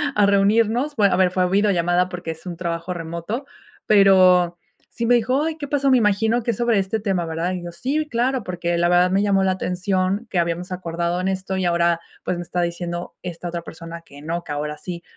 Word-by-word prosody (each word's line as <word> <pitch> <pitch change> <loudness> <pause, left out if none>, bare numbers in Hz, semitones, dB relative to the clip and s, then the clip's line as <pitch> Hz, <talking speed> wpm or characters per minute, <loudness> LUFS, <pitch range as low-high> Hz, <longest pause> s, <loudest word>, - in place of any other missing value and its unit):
a 210 - +4
reunirnos, 220 +8 +2
bueno, 200 -3 +4
a - - +2
ver, 185 -1 +3
fue 185 0 +1
videollamada 180 -2 +2
porque 175 -2 -5
es 160 - -11
un 175 -2 -6
trabajo 170 0 -3
remoto, 170 - -5 0.4
pero, 185 -4 +5 0.3
sí 235 - -4
me 245 +1 +5
dijo: 255 +5 +1
"Ay, 320 0 -2
¿qué 290 -2 -5
pasó?, 275 -1 +1
me 260 - +6
imagino 220 +2 +2
que 235 - 0
es 215 - -6
sobre 235 -3 +2
este 195 +3 -1
tema, 190 -4 0
¿verdad?", 165 +2 -2
y 180 -1 -5
yo: 175 - -6
"Sí, 295 - -2
claro, 250 +2 0
porque 175 -1 -2
la 170 0 +2
verdad 180 +1 +4
me 195 +1 +2
llamó 195 -2 +2
la 190 - +2
atención 185 +3 -1
que 180 - 0
habíamos 170 +2 -2
acordado 170 -1 -2
en 185 - -1
esto, 190 0 -3
y 190 - -1
ahora, 170 -1 +2 0.3
pues, 180 - -1
me 175 - -4
está 175 +1 -2
diciendo 175 0 -4
esta 175 -1 -6
otra 170 0 -4
persona 165 0 -9
que 140 +1 -14
no, 170 +3 -3
que - - -7
ahora 150 +1 -3
así", 170 +3 -7
185 Hz, 225 wpm, -22 LUFS, 170-210 Hz, 0.4 s, me